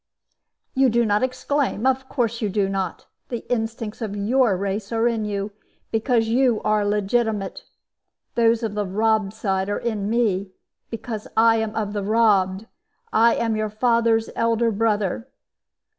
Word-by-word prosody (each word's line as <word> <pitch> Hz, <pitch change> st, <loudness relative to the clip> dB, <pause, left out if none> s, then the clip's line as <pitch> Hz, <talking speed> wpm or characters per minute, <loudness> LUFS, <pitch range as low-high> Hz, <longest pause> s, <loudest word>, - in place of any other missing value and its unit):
"You 265 Hz, -1 st, +4 dB
do 235 Hz, +1 st, +2 dB
not 210 Hz, -1 st, +2 dB
exclaim 255 Hz, -1 st, -1 dB
of 265 Hz, 0 st, +1 dB
course 235 Hz, -3 st, -1 dB
you 210 Hz, -, 0 dB
do 200 Hz, 0 st, +1 dB
not. 195 Hz, -2 st, -3 dB, 0.2 s
The 240 Hz, -2 st, -5 dB
instincts 225 Hz, -1 st, -4 dB
of 210 Hz, -3 st, -3 dB
your 220 Hz, 0 st, +2 dB
race 200 Hz, +2 st, -3 dB
are 230 Hz, +1 st, +2 dB
in 225 Hz, -2 st, -1 dB
you, 200 Hz, 0 st, -3 dB, 0.4 s
because 225 Hz, 0 st, +1 dB
you 240 Hz, -1 st, +2 dB
are 215 Hz, -1 st, +2 dB
legitimate. 205 Hz, 0 st, -1 dB, 0.7 s
Those 230 Hz, 0 st, +3 dB
of 220 Hz, -2 st, -2 dB
the 205 Hz, -1 st, -2 dB
robbed 215 Hz, +1 st, +1 dB
side 195 Hz, -2 st, -1 dB
are 205 Hz, -, 0 dB
in 210 Hz, -4 st, -2 dB
me, 200 Hz, -5 st, 0 dB, 0.4 s
because 225 Hz, -1 st, -6 dB
I 225 Hz, 0 st, +5 dB
am 220 Hz, -1 st, -2 dB
of 210 Hz, -2 st, -2 dB
the 205 Hz, -, -2 dB
robbed. 200 Hz, -2 st, +2 dB, 0.5 s
I 230 Hz, +1 st, +5 dB
am 225 Hz, -1 st, 0 dB
your 215 Hz, 0 st, -1 dB
father's 230 Hz, 0 st, +2 dB
elder 230 Hz, 0 st, +2 dB
brother. 215 Hz, +1 st, 0 dB
220 Hz, 155 wpm, -23 LUFS, 205-230 Hz, 0.7 s, I